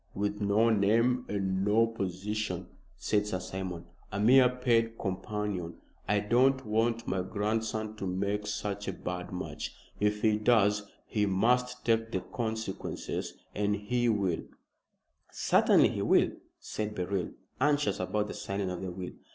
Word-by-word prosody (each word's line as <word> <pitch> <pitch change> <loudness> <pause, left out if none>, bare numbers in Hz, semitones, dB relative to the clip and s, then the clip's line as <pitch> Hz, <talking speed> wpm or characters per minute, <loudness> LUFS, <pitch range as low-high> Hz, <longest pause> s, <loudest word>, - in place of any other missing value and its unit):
"With 105 +1 -2
no 105 +3 +3
name 115 +4 +3
and 95 -2 0
no 105 +3 +4
position," 105 0 -3 0.3
said 105 0 +1
Sir 95 - -1
Simon, 90 -2 -5 0.3
"a 105 - -3
mere 125 +4 +7
paid 115 -3 +1
companion. 95 -3 -3 0.3
I 105 0 +2
don't 130 +5 +3
want 115 +2 0
my 95 -1 0
grandson 110 +2 -2
to 100 - -3
make 100 +3 -1
such 100 0 -3
a 95 - -1
bad 90 0 -5
match. 90 - -5 0.2
If 105 0 +1
he 110 -1 +3
does, 105 -2 +3 0.2
he 105 -1 0
must 125 +6 +1
take 115 -1 +2
the 95 - -1
consequences. 110 -4 -4 0.2
And 105 0 +1
he 120 +4 0
will 100 -6 0 0.5
" - - -49
"Certainly - - +4
he - - -3
will," - - +4 0.3
said 105 0 -4
Beryl, 95 0 -1 0.3
anxious 145 +1 +2
about 105 +3 0
the - - -6
signing 100 -1 -3
of 90 - -5
the 95 - -3
will. 90 0 -6
105 Hz, 150 wpm, -30 LUFS, 95-115 Hz, 0.5 s, mere